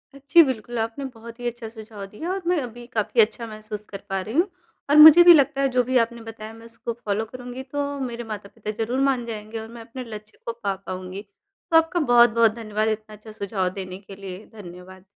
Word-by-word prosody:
अ, - - -10
जी। 340 - +9
बिल्कुल, 240 -3 -3
आपने 225 +5 -3
बहुत 230 +1 -11
ही 245 - -3
अच्छा 240 -1 -5
सुझाव 220 -2 -9
दिया 265 - -6
और 385 +1 -2
मैं 355 0 +3
अभी 240 -1 -8
काफ़ी 225 +2 +3
अच्छा 230 +2 0
महसूस 215 -1 -8
कर 200 - -7
पा 195 0 -1
रही 215 +4 -7
हूँ, 345 +5 +4 0.4
और 290 - +4
मुझे 315 +3 +11
भी 350 0 +10
लगता 275 -3 +3
है 275 - +3
जो 250 - +4
भी 255 +1 +1
आपने 235 0 -7
बताया 225 -1 -9
मैं 225 0 -14
उसको 230 0 -6
फ़ॉलो 220 -2 -2
करूँगी 250 +2 -8
तो 285 +2 -3 0.2
मेरे 240 -3 -4
माता-पिता 210 +1 -6
ज़रूर 245 +4 -2
मान 250 -3 -1
जाएँगे 220 0 -6
और 220 - -8
मैं 235 - -9
अपने 235 +3 -8
लक्ष्य 215 -3 -10
को 230 - -3
पा 200 -1 0
पाऊँगी। 185 +1 -6 0.5
तो 325 - +7
आपका 325 +2 +2
बहुत-बहुत 235 -5 +5
धन्यवाद 215 -1 -2
इतना 215 0 -4
अच्छा 215 +1 -13
सुझाव 200 -3 -2
देने 185 -1 -7
के 195 - -9
लिए। 195 +1 -9
धन्यवाद। 185 -1 -11
225 Hz, 220 wpm, -24 LUFS, 210-245 Hz, 0.5 s, मुझे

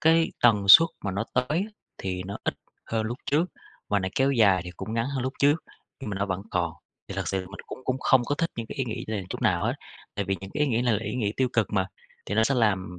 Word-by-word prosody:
cái 165 +1 +4
tần 105 -4 +5
suất 165 +11 +10 0.2
mà 100 - 0
nó 100 +4 -1
tới 150 +10 +1 0.3
thì 90 -1 -3
nó 100 - -4
ít - - 0 0.3
hơn 110 -1 -1
lúc 120 +3 -4
trước, 155 +5 +3 0.4
mà 100 - +2
nó 95 - -2
kéo 135 +1 +3
dài 100 -7 +5
thì 90 - -6
cũng 110 - -5
ngắn 115 +1 0
hơn 130 - -1
lúc 130 - -2
trước, 145 +2 +5 0.4
nhưng 130 -6 -5
mà 100 - -3
nó 100 - 0
vẫn 95 0 -3
còn. 85 -3 0 0.4
Thì 100 - -5
thực 95 -4 -2
sự 95 - 0
mình 100 +2 -9
cũng - - -7
cũng 130 +1 0
không 130 -2 +4
có 145 - 0
thích 165 +3 -1
những 115 -1 -4
cái - - -8
ý 135 - +1
nghĩ 115 -3 -4
này 105 -4 -2
chút - - -5
nào - - +2
hết. - - +1 0.4
Tại 100 - -1
vì 95 0 -1
những 95 0 -8
cái 150 - -2
ý - - +3
nghĩ 120 0 +1
này 120 -3 +3
là 105 - -1
ý - - -3
nghĩ 105 -5 0
tiêu 130 -1 +2
cực 110 -2 +1
mà, 95 -2 +2 0.4
thì 105 - -2
nó 110 +1 +4
sẽ 135 +4 +2
làm 95 -6 +1
110 Hz, 280 wpm, -26 LUFS, 95-130 Hz, 0.4 s, suất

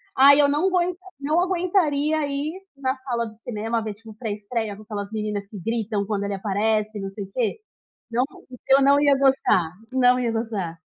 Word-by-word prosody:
Ai, 280 +2 +8
eu 285 - +5
não 305 +7 +2
guen 360 -1 +1 0.2
não 305 +4 +1
aguentaria 335 -5 +1
ir 285 +3 -2 0.2
na 265 -1 -1
sala 245 -3 -2
de 220 0 -13
cinema 225 0 -2
ver, 215 - -4
tipo, 220 +1 -13
pré 220 -2 -4
estreia 215 0 -3
com 210 - -13
aquelas 205 -1 -5
meninas 210 -2 -3
que 205 -1 -9
gritam 215 0 -1
quando 205 -1 -2
ele 200 0 -2
aparece 210 +2 0
e 200 - -5
não 195 - -5
sei 200 +1 -6
o 195 - -18
quê. 245 - -1 0.5
Não, 245 +3 +2 0.4
eu 270 +1 +6
não 280 +1 +5
ia 285 -1 +5
gostar, 265 - +3 0.2
não 250 -1 +4
ia 240 -2 0
gostar. 210 -7 -3
230 Hz, 200 wpm, -24 LUFS, 210-280 Hz, 0.5 s, Ai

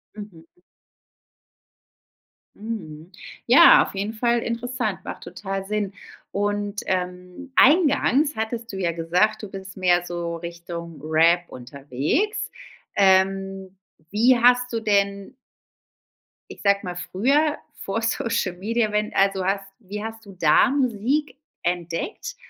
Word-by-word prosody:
Mhm. 205 -6 -10 2.1
Mhm. 175 -7 -7 0.4
Ja, 280 +9 +8
auf - - -8
jeden 200 +3 -3
Fall 235 +1 +1
interessant, 235 -2 -3
macht - - -7
total 195 +2 -5
Sinn. 205 -1 -2 0.4
Und, 205 0 -2
ähm, 180 +7 -4
eingangs 295 -1 +4
hattest 225 +1 -4
du - - -4
ja 180 -3 0
gesagt, 180 +7 0
du 210 - -6
bist 195 0 -9
mehr 180 -1 +3
so 170 -1 -4
Richtung 170 -1 -8
Rap 165 +3 +3
unterwegs. 140 - -2 0.4
Ähm, 195 0 +2 0.4
wie 240 +5 +4
hast 245 +1 +4
du 230 - -1
denn 200 +1 0 1.2
ich - - -11
sag 200 0 +3
mal, 180 -2 -5
früher 275 - +1 0.2
vor 225 -4 -4
Social 230 -4 -1
Media, 220 +3 0
wenn 210 0 -1
also 195 -1 +2
hast 195 +1 -1
wie 210 -1 -7
hast 225 0 -7
du 200 - -12
da 155 +5 +5
Musik 270 +3 0 0.3
entdeckt? 175 - -3
200 Hz, 120 wpm, -23 LUFS, 180-230 Hz, 2.1 s, Ja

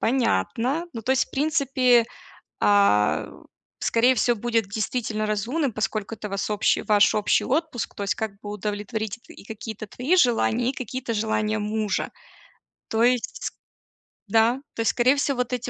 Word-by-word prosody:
понятно. 245 - 0
Ну 225 -2 -6
то 260 - +1
есть 265 - +2
в - - -29
принципе, 265 -5 +3 0.6
а, 200 - +3 0.5
скорее 245 +3 +3
всего, 240 0 +2
будет 225 -2 0
действительно 215 +1 -2
разумным, 240 +7 -1
поскольку 215 0 -3
это 210 -1 -7
вас 195 0 -3
общи 210 - +2
ваш 205 -1 +4
общий 210 -1 +2
отпуск, 300 -3 -2
то 205 - -6
есть 200 - 0
как 220 -2 -3
бы 205 - -7
удовлетворить 210 +2 -4
т - - -13
и - - -14
какие-то 220 -1 -7
твои 265 - 0
желания, 245 -3 +2
и - - -4
какие-то 255 -2 -4
желания 215 0 0
мужа. 210 -1 -1 0.8
То 225 +1 +1
есть, 245 -1 0 0.8
да. 225 +4 +3 0.2
То 230 - -2
есть, 225 - +2
скорее 255 +3 +3
всего, 280 -1 0
вот 250 0 -1
эти 250 0 -3
225 Hz, 160 wpm, -24 LUFS, 210-250 Hz, 0.8 s, ваш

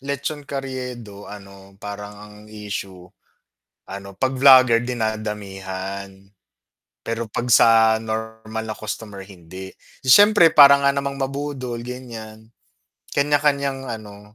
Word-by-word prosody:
lechon 140 +2 -5
Carriedo 125 -6 -7
ano 100 -1 -13
parang 105 0 -8
ang 105 0 -13
issue, 100 -4 -7 0.8
ano 100 0 -8
'pag 130 +6 -2
vlogger 130 -3 +6
dinadamihan, 100 -4 -5 0.9
pero 115 0 -4
'pag 120 - -3
sa 110 -1 +5
normal 110 0 -5
na 110 - -5
customer 105 -2 -7
hindi. 95 0 -11 0.3
'Di - - -6
siyempre 205 -2 +6
parang 140 -1 +7
nga 140 - +4
namang 140 0 -3
mabudol 135 -3 -4
ganiyan, 115 -3 -10 0.6
kanya-kanyang 140 -2 0
ano, 105 -3 -9
110 Hz, 110 wpm, -21 LUFS, 105-135 Hz, 0.9 s, parang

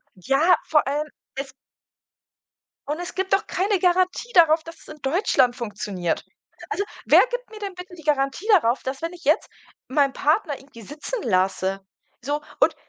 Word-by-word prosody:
Ja, 275 - +3
vor 300 -3 +2
allem 295 +2 -1 0.3
es 270 0 -5 1.4
Und 300 +3 -2
es 350 0 -6
gibt 380 0 -1
doch 390 - +3
keine 390 +2 0
Garantie 370 +6 +1
darauf, 325 -2 +6
dass 330 +1 -10
es - - -17
in 305 -1 -11
Deutschland 270 - +2
funktioniert. 200 -7 -3 0.4
Also, 415 -2 -1 0.2
wer - - +7
gibt - - -4
mir 435 - -10
denn 400 -2 -5
bitte 360 0 -10
die 325 - -13
Garantie 285 +5 0
darauf, 280 - +4
dass 265 +1 -4
wenn 335 +1 -3
ich 355 0 -13
jetzt 305 0 +2 0.4
meinen 275 0 +2
Partner 305 0 +1
irgendwie 265 -4 -15
sitzen 300 - -5
lasse? 190 -1 +1 0.4
So, 290 +4 -2 0.2
und - - +4
300 Hz, 170 wpm, -23 LUFS, 265-360 Hz, 1.4 s, wer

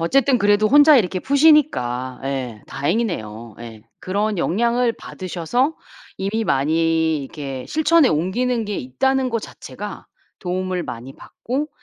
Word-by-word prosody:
아휴 - - -2
어쨌든 270 +7 +3
그래도 205 0 +3
혼자 290 +1 +7
이렇게 185 -3 -1
푸시니까 260 - +2
예 130 -5 -4
다행이네요 135 - -3
예. 115 -2 -10 0.2
그런 205 +2 -1
영향을 235 +7 +1
받으셔서 200 - -2 0.4
이미 215 +4 -2
많이 160 +2 +1
이렇게 135 -2 -7
실천에 315 -2 +3
옮기는 225 +9 0
게 205 -1 -3
있다는 260 - 0
거 230 - 0
자체가 - - -9 0.4
도움을 185 -1 -2
많이 125 +3 -8
받고 280 +5 -5
190 Hz, 310 characters per minute, -21 LUFS, -, 0.4 s, 혼자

